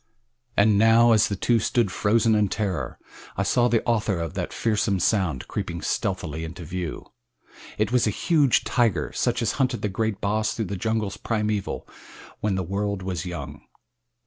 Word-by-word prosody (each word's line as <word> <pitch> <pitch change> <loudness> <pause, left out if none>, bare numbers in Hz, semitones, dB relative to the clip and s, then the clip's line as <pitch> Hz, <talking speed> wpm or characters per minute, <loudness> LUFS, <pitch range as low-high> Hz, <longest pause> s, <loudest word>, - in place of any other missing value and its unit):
And 100 0 +4
now, 115 +2 +6
as 110 -2 +5
the 100 - -2
two 115 +4 +2
stood 110 -1 +1
frozen 110 +3 +2
in 105 -1 +3
terror, 95 -3 -3 0.4
I 100 - +1
saw 120 +5 +3
the 115 -2 +1
author 110 -5 +1
of 85 -2 -4
that - - -3
fearsome 105 -3 0
sound 90 - 0
creeping 85 -5 -4
stealthily 80 -4 -2
into 85 +1 -7
view. 90 -1 -5 0.6
It 110 +3 0
was 125 -2 +3
a - - +3
huge 145 - +2
tiger 110 - +1
such - - 0
as - - +1
hunted 130 - 0
the 105 - 0
great 110 +1 -2
Bos 110 +2 0
through 110 - -2
the - - -1
jungles 110 +1 -2
primeval 105 -3 -2 0.5
when 105 -2 0
the 95 - -1
world 100 +2 -2
was 90 -2 -3
young. 70 -5 -6
105 Hz, 170 wpm, -25 LUFS, 90-110 Hz, 0.6 s, now